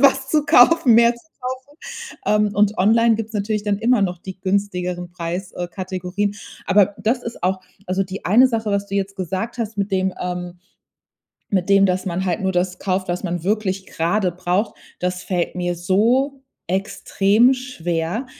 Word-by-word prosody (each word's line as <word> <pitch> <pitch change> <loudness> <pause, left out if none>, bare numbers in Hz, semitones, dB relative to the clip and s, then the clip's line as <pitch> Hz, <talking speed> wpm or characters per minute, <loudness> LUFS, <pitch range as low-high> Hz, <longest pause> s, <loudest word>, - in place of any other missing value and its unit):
was 270 -1 +4
zu 300 +1 +2
kaufen, 260 -1 +6
mehr 235 +1 +6
zu - - -16
kaufen. 235 - -23 1.0
Ähm, 210 -1 +2
und 210 0 +2
online 225 +4 +4
gibt's 225 0 -5
natürlich 210 0 -1
dann 205 -1 0
immer 235 +1 +2
noch 180 -3 -1
die 190 +1 -9
günstigeren 180 -2 -2
Preis 175 +2 -5
äh 175 0 -4
Kategorien. 185 +2 -3 0.3
Aber 200 +1 +3
das 245 +3 0
ist 235 -6 -7
auch 185 +1 +1 0.3
Also, 190 +1 +1
die 190 +1 -8
eine 240 +8 +6
Sache, 220 -3 -2
was 200 0 0
du 200 - -4
jetzt 195 0 -2
gesagt 190 +7 -3
hast 225 -2 -4
mit 200 0 -1
dem, 190 0 +1
ähm 180 0 -5 0.9
mit 185 -2 0
dem, 195 0 +6
dass 185 +1 -1
man 185 +1 -2
halt 180 +1 -1
nur 190 - 0
das 180 0 -1
kauft, 190 0 -1
was 175 +2 -2
man 175 -2 -3
wirklich 195 -2 -1
gerade 180 +3 0
braucht, 180 +4 -1 0.2
das 180 0 -2
fällt 180 -1 -2
mir 175 -1 -1
so 230 +11 +1 0.3
extrem 200 +5 +2
schwer. 175 -4 -3
195 Hz, 175 wpm, -21 LUFS, 180-220 Hz, 1.0 s, kaufen